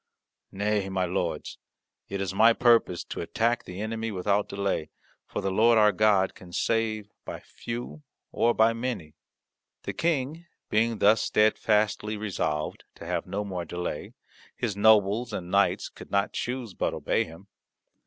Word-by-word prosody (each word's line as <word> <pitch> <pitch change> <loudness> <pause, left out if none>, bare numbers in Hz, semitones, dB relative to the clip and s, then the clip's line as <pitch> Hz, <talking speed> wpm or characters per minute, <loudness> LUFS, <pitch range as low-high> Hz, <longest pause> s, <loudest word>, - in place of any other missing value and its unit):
Nay, 100 0 0
my 95 -1 0
lords, 90 - -3 0.5
it 100 - -3
is 95 -1 -2
my 115 +4 +6
purpose 115 -7 +3
to - - -6
attack 120 +1 0
the 90 +1 -8
enemy 110 +1 -3
without 100 +2 0
delay, 100 -6 -2 0.4
for - - -4
the 95 - -1
Lord 115 +4 +5
our 105 -1 +6
God 105 -3 +3
can 90 -1 -14
save 110 +1 -1
by - - -6
few 120 +6 -7 0.3
or 120 0 +2
by 110 +1 +4
many." 115 -10 -4 0.7
The - - -4
King 160 +1 -1 0.2
being 115 +1 +2
thus 105 +2 +5
steadfastly 105 0 +2
resolved 85 -8 -2
to - - -10
have - - -2
no 105 +1 -3
more 90 -3 -4
delay, 90 -2 -5 0.4
his 110 -5 -2
nobles 110 +2 +4
and 90 -3 -5
knights 100 0 +2
could - - -13
not 100 0 +1
choose 125 -4 -3
but - - -1
obey - - +1
him. 80 +5 -13
105 Hz, 155 wpm, -27 LUFS, 95-115 Hz, 0.7 s, my